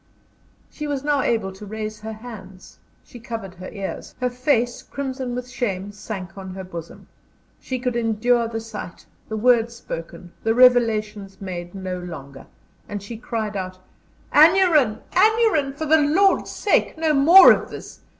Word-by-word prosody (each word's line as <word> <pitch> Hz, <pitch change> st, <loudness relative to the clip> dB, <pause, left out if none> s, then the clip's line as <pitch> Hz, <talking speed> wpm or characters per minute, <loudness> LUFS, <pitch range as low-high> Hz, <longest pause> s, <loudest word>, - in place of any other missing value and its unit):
She 300 Hz, -, -6 dB
was 285 Hz, -2 st, -3 dB
now 290 Hz, -1 st, +1 dB
able 220 Hz, -6 st, 0 dB
to 190 Hz, -, -12 dB
raise 215 Hz, +1 st, -6 dB
her 220 Hz, +1 st, -6 dB
hands 215 Hz, -5 st, -12 dB, 0.2 s
she 245 Hz, -, -13 dB
covered 225 Hz, -5 st, -7 dB
her 185 Hz, 0 st, -9 dB
ears; 195 Hz, -2 st, -7 dB
her 250 Hz, -1 st, 0 dB
face, 245 Hz, -1 st, 0 dB
crimson 260 Hz, -3 st, -5 dB
with 250 Hz, 0 st, -5 dB
shame, 205 Hz, -6 st, -3 dB
sank 195 Hz, -3 st, -7 dB
on 190 Hz, -1 st, -8 dB
her 190 Hz, -, -6 dB
bosom. 170 Hz, -3 st, -9 dB, 0.5 s
She 260 Hz, -, -4 dB
could 250 Hz, -1 st, -2 dB
endure 235 Hz, +1 st, +1 dB
the 225 Hz, 0 st, -4 dB
sight, 220 Hz, -5 st, -9 dB, 0.2 s
the 220 Hz, -, -3 dB
words 235 Hz, 0 st, +3 dB
spoken, 175 Hz, -5 st, -8 dB
the 225 Hz, 0 st, +1 dB
revelations 215 Hz, -5 st, +3 dB
made, 175 Hz, -2 st, -7 dB
no 185 Hz, -1 st, -4 dB
longer, 140 Hz, -6 st, -9 dB, 0.4 s
and 205 Hz, -1 st, -5 dB
she 230 Hz, +3 st, -7 dB
cried 220 Hz, -2 st, -4 dB
out: 185 Hz, -1 st, -4 dB, 0.6 s
"Aneurin! 310 Hz, -, +5 dB
Aneurin! 420 Hz, -8 st, +3 dB
for 315 Hz, +3 st, -5 dB
the 315 Hz, +1 st, +4 dB
Lord's 365 Hz, +7 st, +3 dB
sake, 405 Hz, -, 0 dB
no 315 Hz, -1 st, +1 dB
more 330 Hz, +7 st, +9 dB
of -, -, +1 dB
this! -, -, -10 dB
225 Hz, 160 wpm, -22 LUFS, 195-265 Hz, 0.6 s, more